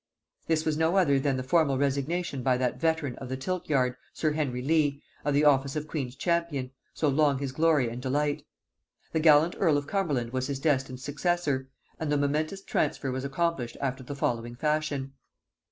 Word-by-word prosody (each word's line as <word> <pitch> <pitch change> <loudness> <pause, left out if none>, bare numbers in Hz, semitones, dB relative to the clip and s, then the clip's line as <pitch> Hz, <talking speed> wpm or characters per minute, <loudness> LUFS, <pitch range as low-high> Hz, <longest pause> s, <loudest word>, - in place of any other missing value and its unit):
This 160 -1 +1
was 155 -1 +1
no 160 +3 +2
other 140 -8 +4
than 135 -1 0
the 130 - -3
formal 140 0 +2
resignation 140 +2 -1
by 125 0 +2
that 125 -1 -1
veteran 160 -5 0
of 130 - -7
the 130 - -3
tilt 180 +7 -3
yard, 125 -3 +2 0.2
sir 155 - 0
Henry 135 -5 -2
Leigh, 145 -1 +1 0.2
of 145 -1 +1
the 150 +1 +4
office 140 -1 +3
of 150 0 -3
queen's 135 -5 -4
champion, 165 -5 -1 0.2
so 155 - -1
long 145 0 +3
his 135 -1 -3
glory 155 -3 +3
and 120 +2 -5
delight. 145 +3 0 0.7
The 160 - +1
gallant 155 +1 +5
earl 155 -3 +4
of 145 - -2
Cumberland 145 -10 -1
was 130 0 -1
his 140 -2 -3
destined 135 -4 0
successor, 145 -2 -1 0.3
and 155 -2 -2
the 145 - +3
momentous 155 +7 -1
transfer 140 -3 -1
was 130 +1 -3
accomplished 140 -3 -1
after 135 -1 -2
the 140 +3 -6
following 120 -3 -2
fashion. 150 -1 -1
145 Hz, 185 wpm, -28 LUFS, 130-155 Hz, 0.7 s, gallant